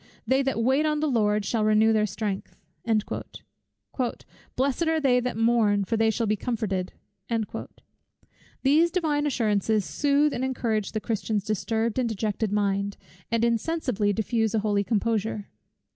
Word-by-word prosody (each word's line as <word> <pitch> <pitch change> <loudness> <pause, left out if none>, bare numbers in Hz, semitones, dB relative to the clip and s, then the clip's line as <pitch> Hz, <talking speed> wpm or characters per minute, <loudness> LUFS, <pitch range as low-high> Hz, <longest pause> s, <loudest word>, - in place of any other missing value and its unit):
"They 260 +4 +3
that 270 -4 0
wait 265 +5 +3
on 300 0 0
the 310 - 0
Lord, 210 -5 +1
shall 220 +1 0
renew 215 +1 +4
their 215 -1 +2
strength." 200 0 -4 2.0
"Blessed 275 +5 0
are 320 0 +2
they 260 -4 +3
that 245 -2 -3
mourn, 225 -3 +3
for 225 - -1
they 225 0 +3
shall 230 +1 0
be 215 0 +1
comforted." 200 -5 -2 1.7
These 305 +5 +4
Divine 310 -4 0
assurances 215 -5 +1
sooth 290 +1 +2
and 250 - -2
encourage 230 -6 -1
the 215 - -2
Christian's 215 -2 -1
disturbed 220 +3 -1
and 245 -2 +1
dejected 215 0 -2
mind, 200 -1 0 0.3
and 230 0 +2
insensibly 235 -3 0
diffuse 225 +1 0
a - - +3
holy 205 -1 +2
composure. 215 -1 -1
225 Hz, 145 wpm, -26 LUFS, 210-260 Hz, 2.0 s, renew